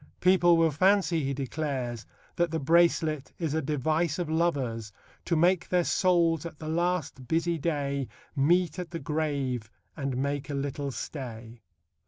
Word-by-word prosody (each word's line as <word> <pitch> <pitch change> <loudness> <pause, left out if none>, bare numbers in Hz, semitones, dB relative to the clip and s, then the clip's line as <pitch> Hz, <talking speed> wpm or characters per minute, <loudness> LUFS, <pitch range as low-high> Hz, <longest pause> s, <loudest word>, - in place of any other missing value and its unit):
People 180 -2 +5
will 165 -1 +4
fancy, 180 0 +3
he 135 - -1
declares, 135 -4 -3 0.3
that 175 0 +1
the 160 0 -2
bracelet 160 -1 +2
is 160 -4 -2
a 160 - +1
device 155 +3 0
of 170 -3 -3
lovers 130 -10 0 0.3
To 170 - +1
make 180 +2 +3
their 180 -1 +3
souls 170 -4 +2
at 170 -3 -7
the 155 - -8
last 170 -6 -1
busy 165 +3 0
day 140 -4 -1 0.3
Meet 170 +4 +2
at 180 -2 -5
the 170 - -5
grave 140 -8 -2 0.3
and 135 -4 -3
make 140 +2 -2
a 145 - -2
little 140 0 -3
stay. 120 -4 -7
155 Hz, 155 wpm, -28 LUFS, 140-170 Hz, 0.3 s, People